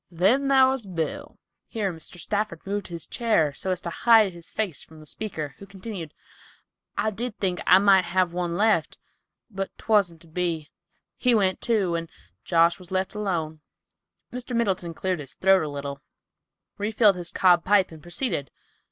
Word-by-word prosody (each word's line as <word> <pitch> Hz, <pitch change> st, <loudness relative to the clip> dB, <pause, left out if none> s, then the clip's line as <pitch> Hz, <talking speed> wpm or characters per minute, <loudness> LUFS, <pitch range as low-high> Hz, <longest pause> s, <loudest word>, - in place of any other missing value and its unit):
Then 200 Hz, +11 st, +2 dB
thar 265 Hz, -1 st, +6 dB
was 260 Hz, -6 st, -4 dB
Bill." 190 Hz, -, -4 dB, 0.3 s
Here 205 Hz, -6 st, -2 dB
Mr. 165 Hz, +2 st, -9 dB
Stafford 205 Hz, -3 st, -3 dB
moved 200 Hz, +1 st, -3 dB
his 170 Hz, -2 st, -7 dB
chair 210 Hz, -, +1 dB
so 190 Hz, -, -4 dB
as 180 Hz, -1 st, -1 dB
to 170 Hz, -, -4 dB
hide 220 Hz, 0 st, +5 dB
his 170 Hz, 0 st, -11 dB
face 190 Hz, -11 st, -3 dB
from 160 Hz, -1 st, -15 dB
the 155 Hz, -, -13 dB
speaker, 155 Hz, -5 st, -5 dB
who 200 Hz, -, -11 dB
continued, 190 Hz, -5 st, -8 dB, 0.8 s
"I 215 Hz, -, +1 dB
did 230 Hz, +2 st, -5 dB
think 185 Hz, -3 st, -1 dB
I 185 Hz, -, +8 dB
might 195 Hz, -1 st, +5 dB
have 185 Hz, -2 st, +1 dB
one 175 Hz, -1 st, -2 dB
left, 210 Hz, -6 st, +2 dB, 0.5 s
but 195 Hz, -1 st, -3 dB
'twasn't 195 Hz, -7 st, +1 dB
to 170 Hz, -, -15 dB
be. 165 Hz, -2 st, -2 dB, 0.5 s
He 250 Hz, -2 st, +3 dB
went, 190 Hz, -3 st, +1 dB
too, 205 Hz, -7 st, +1 dB
and 165 Hz, -1 st, -3 dB, 0.3 s
Josh 170 Hz, +3 st, +3 dB
was 180 Hz, -1 st, -11 dB
left 190 Hz, +1 st, -1 dB
alone." 170 Hz, -7 st, -3 dB, 0.7 s
Mr. 250 Hz, 0 st, -5 dB
Middleton 185 Hz, -7 st, -1 dB
cleared 185 Hz, -1 st, -1 dB
his 135 Hz, -3 st, -9 dB
throat 190 Hz, 0 st, +4 dB
a 155 Hz, -, -3 dB
little, 140 Hz, 0 st, -6 dB, 0.8 s
refilled 210 Hz, -1 st, +3 dB
his 175 Hz, -1 st, -5 dB
cob 175 Hz, -2 st, +4 dB
pipe, 195 Hz, -2 st, +3 dB
and 160 Hz, -1 st, -12 dB
proceeded. 175 Hz, -, -2 dB
185 Hz, 170 wpm, -25 LUFS, 170-210 Hz, 0.8 s, I